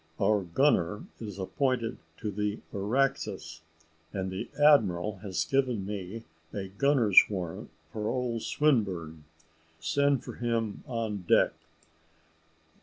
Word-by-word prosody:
Our 105 -1 +3
gunner 95 - +1 0.2
is 105 -4 -7
appointed 120 +4 -1 0.2
to 105 -3 -3
the 105 +1 -2
Araxes, 105 -5 -1 0.5
and 95 -2 -3
the 95 - -5
admiral 105 - +4
has 95 -2 -2
given 130 -7 +1
me 100 +2 -5 0.3
a 95 -2 -5
gunner's 115 -1 +5
warrant 90 -5 -5 0.2
for 105 -1 -2
old 120 -3 -1
Swinburne. 95 - 0 0.5
Send 140 - +2
for - - -7
him 115 -3 -1
on 115 -4 -2
deck." - - +5
105 Hz, 110 wpm, -29 LUFS, 95-125 Hz, 0.5 s, gunner's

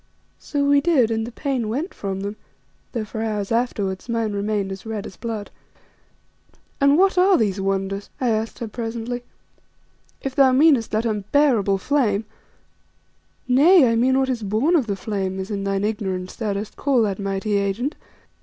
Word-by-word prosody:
So 285 -1 -1
we 285 0 +5
did, 275 -8 +3
and 225 0 -1
the - - -7
pain 255 -4 -2
went 290 - -3
from 195 -1 -4
them, 200 +1 -4 0.6
though, 230 -3 -3
for 220 +1 -5
hours 210 -2 -2
afterwards, 220 -4 -1
mine 230 -2 -1
remained 200 -1 -1
red 220 -2 -5
as - - -9
blood. 220 -3 -5 1.3
"And 280 +1 +5
what 380 0 +4
are 375 +1 +5
these 200 -3 0
wonders?" 195 +1 -2
I 250 - +1
asked 220 0 -1
her 235 - -5
presently. 235 +2 -4 1.0
"If 270 - -4
thou 265 -1 +5
meanest 270 -4 +4
that 220 +2 -1
unbearable 215 -1 +2
flame 220 -3 +1 0.7
" - - -42 0.2
"Nay, 285 +4 +6
I - - +1
mean 255 +3 +3
what 265 0 +1
is 245 -3 -1
born 220 - +1
of 275 -8 +2
the 200 - -1
flame, 190 -1 -3
as, 190 +3 -5
in 200 -1 -3
thine 195 0 0
ignorance 190 -4 -3
thou 215 -4 -2
dost 205 +2 -5
call 270 -5 +2
that 200 -2 -2
mighty 200 +1 -1
agent. 200 - -1
220 Hz, 175 wpm, -22 LUFS, 200-260 Hz, 1.3 s, Nay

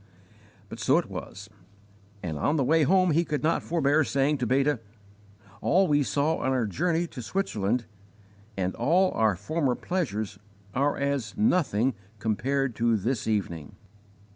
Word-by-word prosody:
But - - -9
so - - +3
it - - 0
was; 100 +2 -7 0.8
and 80 -3 -3
on 145 - +1
the 140 - +2
way 160 +5 +3
home 185 +3 +4
he 165 +3 +3
could 150 -3 -3
not 165 +2 +2
forbear 155 -2 +2
saying 140 +1 +1
to 125 - -1
Beta: 135 +2 +2 0.8
"All 190 +2 +3
we 145 -2 +3
saw 140 +7 +1
on 130 - -1
our 130 -3 +1
journey 170 - 0
to 140 -6 -8
Switzerland, 115 - -1 0.7
and 95 -1 -1
all 175 +10 +2
our 110 -3 +2
former 130 - -1
pleasures, 110 - -3 0.3
are 140 +3 +1
as 140 -5 -2
nothing 145 - +2 0.2
compared 130 +5 -1
to 115 -1 +2
this 115 +4 -2
evening." 85 -8 -2
135 Hz, 150 wpm, -27 LUFS, 110-160 Hz, 0.8 s, home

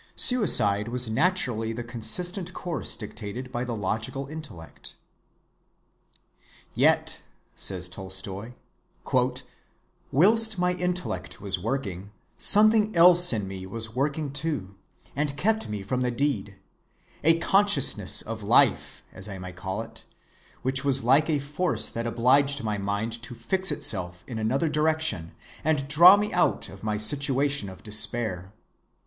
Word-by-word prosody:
Suicide 110 - +6
was 120 -1 -2
naturally 120 -6 0
the 120 +1 -6
consistent 175 - -3
course 165 - -4
dictated 115 +3 -8
by 120 -1 -4
the 120 -2 -5
logical 110 +7 -3
intellect. 140 - -10 1.8
"Yet," - - +1 0.3
says 90 -2 0
Tolstoy, 95 +4 -7 1.6
"whilst 220 - +3
my 180 0 0
intellect 180 -7 -4
was 95 -2 -4
working, 100 -4 -5 0.3
something 215 0 +6
else 175 +1 +7
in 105 -5 -2
me 95 -1 -8
was 115 +2 -4
working 140 +3 -3
too, 140 -10 -3 0.4
and 140 0 -3
kept 220 +5 -1
me 105 -2 -5
from 125 +6 -3
the 125 - 0
deed—a 120 +5 -4
consciousness 170 - +2
of 110 0 -7
life, 100 - +1
as - - -9
I 95 - -7
may 90 0 -8
call 95 +1 -5
it, - - -12 0.6
which 130 +2 +1
was 135 -2 +2
like 140 +6 +2
a 155 - +1
force 150 +6 -1
that 115 +1 -5
obliged 135 +4 +2
my 105 -2 -3
mind 105 +4 -4
to 120 +1 -8
fix 185 +12 0
itself 90 -3 -1
in 115 -3 -7
another 130 +9 -1
direction 155 - -1 0.3
and 150 -3 -1
draw 170 +7 +7
me 210 +1 -3
out 175 - 0
of 95 +1 -14
my 105 -1 -2
situation 140 +1 +1
of 95 - -14
despair.... 105 -3 0
125 Hz, 130 wpm, -25 LUFS, 105-155 Hz, 1.8 s, else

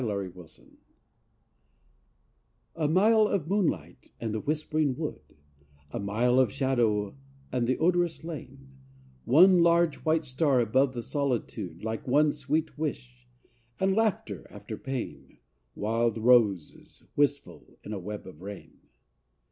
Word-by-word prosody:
ASSUMPTION 95 -6 -6 2.0
I 160 -2 -1
A - - +4
mile 215 +6 +4
of 185 -7 -1
moonlight 195 -2 -1
and 110 -2 -3
the 110 - -1
whispering 155 0 -1
wood: 155 - -4 0.7
A - - -4
mile 115 +6 +2
of 130 - +3
shadow 120 -7 0 0.4
and 125 -2 0
the 130 - +1
odorous 175 -1 +1
lane: 135 -4 -9 0.5
One 175 +7 +6
large, 170 -1 +3
white 160 0 0
star 130 0 +2
above 130 +3 +2
the 120 - -4
solitude, 115 - -3
Like 110 +2 -4
one 145 +4 +4
sweet 150 +2 -2
wish: 125 -5 -5 0.5
and, 190 0 +2
laughter 190 - -1
after - - -8
pain, 130 -3 -6 0.4
Wild 115 +2 0
roses 110 -7 +2
wistful 145 0 -1
in 105 - -6
a 100 - -4
web 105 +3 -7
of 90 -3 -12
rain. 100 0 -10
130 Hz, 125 wpm, -28 LUFS, 110-155 Hz, 2.0 s, One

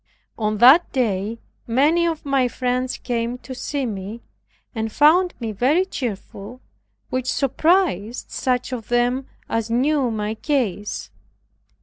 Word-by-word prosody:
On 215 -1 -1
that 265 +10 +7
day 220 -3 -1 0.3
many 300 +8 +3
of 325 -2 -3
my 275 -2 +2
friends 250 +1 -2
came 235 0 -2
to 260 +1 -9
see 275 +2 -3
me, 210 +1 -6 0.5
and 220 -2 -3
found 345 - +4
me 230 -3 -3
very 270 - +2
cheerful, 235 - -6 0.5
which 255 0 -1
surprised 275 - +1
such 250 0 -1
of 230 -3 -5
them 245 +2 +1 0.2
as 225 0 -2
knew 265 +2 +2
my 215 -1 -2
case. 220 - -2
250 Hz, 125 wpm, -22 LUFS, 225-275 Hz, 0.5 s, that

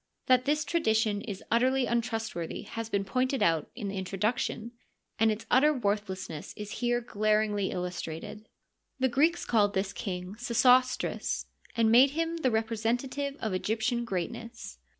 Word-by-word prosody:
That 255 0 +4
this 300 +1 +1
tradition 220 -10 +1
is 200 -3 -6
utterly 255 +3 +3
untrustworthy 225 -8 -2
has 225 +2 -6
been 200 -2 0
pointed 255 +4 0
out 165 -2 +2
in 215 -5 -4
the 195 0 -4
introduction, 215 +5 -2 0.5
and 225 0 +4
its 215 +1 -4
utter 285 +4 +6
worthlessness 200 - -3
is 210 0 -6
here 240 0 +1
glar 215 -1 +2
ingly 205 -2 -1
illustrated. 180 +3 -5 0.5
The 260 0 +2
Greeks 315 +7 +2
called 205 -3 +2
this 190 +1 -1
king 180 -1 -5
Sesostrts, 250 +2 +2 0.3
and 225 -1 +4
made 255 +4 +7
him 330 0 0
the 270 -6 +1
representative 235 +5 -1
of 215 -3 -1
Egyptian 225 +5 0
greatness. 230 +4 -5
225 Hz, 145 wpm, -29 LUFS, 205-255 Hz, 0.5 s, made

